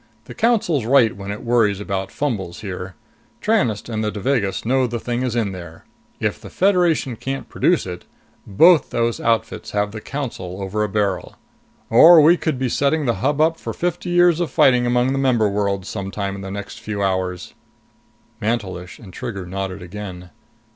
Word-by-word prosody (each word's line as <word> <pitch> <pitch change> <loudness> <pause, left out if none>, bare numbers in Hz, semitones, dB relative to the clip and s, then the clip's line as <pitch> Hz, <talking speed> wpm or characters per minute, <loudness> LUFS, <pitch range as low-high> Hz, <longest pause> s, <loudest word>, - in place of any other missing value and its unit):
The - - -9
Council's 200 - +1
right 120 -2 +4
when 100 0 -8
it 105 - -7
worries 115 -4 +2
about 95 -2 -3
fumbles 100 -12 -3
here. 95 -3 -6 0.4
Tranest 160 - 0
and 110 -2 -3
the 105 - 0
Devagas 105 -1 -1
know 130 +1 +2
the 120 0 -4
thing 120 +1 -3
is 125 -2 -2
in 110 -4 0
there. 85 -3 -10 0.3
If - - -2
the - - -10
Federation 175 -9 +2
can't 135 +4 -5
produce 175 - +1
it, 90 -1 -7 0.4
both 160 - +5
those 115 -1 -1
outfits 115 -1 -1
have 105 0 +1
the 110 0 -7
Council 105 -11 -5
over 100 +2 -2
a 105 - -1
barrel. 100 -3 -1 0.6
Or 160 +9 +9
we 160 +3 +7
could 160 -5 -2
be 130 0 -1
setting 145 +4 +1
the 120 -2 0
Hub 145 +3 +1
up 160 +1 +2
for - - -5
fifty 175 +1 -3
years 175 -1 +4
of 175 - -1
fighting 125 -2 +4
among 125 +1 +2
the 135 - 0
member 125 -5 +2
worlds, 100 -2 -1
sometime 100 -1 -4
in 100 - -7
the 95 - -6
next 100 +2 -7
few 110 -2 -4
hours." 95 -2 -2 0.9
Mantelish 100 -5 -3
and 95 -6 -13
Trigger 100 -5 -5
nodded 95 +1 -5
again. 90 -2 -8
110 Hz, 180 wpm, -21 LUFS, 95-135 Hz, 0.9 s, Or